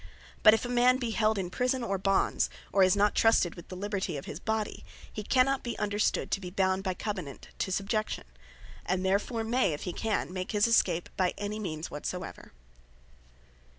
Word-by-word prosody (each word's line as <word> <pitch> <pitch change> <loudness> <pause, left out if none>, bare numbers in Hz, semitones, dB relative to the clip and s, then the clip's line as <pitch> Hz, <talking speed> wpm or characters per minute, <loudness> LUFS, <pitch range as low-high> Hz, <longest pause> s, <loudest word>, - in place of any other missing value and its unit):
But 215 - +8
if 225 - -3
a - - -2
man 245 +1 +4
be 240 -3 -2
held 215 -1 +2
in 180 -2 -3
prison, 250 +2 0
or 195 -4 -1
bonds, 195 +1 +2 0.2
or 195 - +4
is 185 0 +5
not 205 +1 +3
trusted 225 -6 +3
with 170 - -12
the 185 - -8
libertie 195 -4 -2
of 140 - -7
his 150 - -6
bodie; 220 0 -2 0.3
he 215 - -4
cannot 260 +5 +2
be 235 - -4
understood 210 0 0
to 200 - 0
be 180 - -6
bound 190 0 +1
by 185 -2 -1
Covenant 185 -10 -5
to 190 - -1
subjection; 215 +3 -1 0.6
and 185 +1 -1
therefore 205 +4 0
may, 225 -6 +1
if 145 - -6
he 180 - -3
can, 215 -3 -2
make 185 +2 -4
his 210 0 +4
escape 230 -7 +2
by 185 -1 +1
any 205 +1 -3
means 160 -5 -4
whatsoever. 150 - -6
205 Hz, 190 wpm, -29 LUFS, 185-225 Hz, 0.6 s, But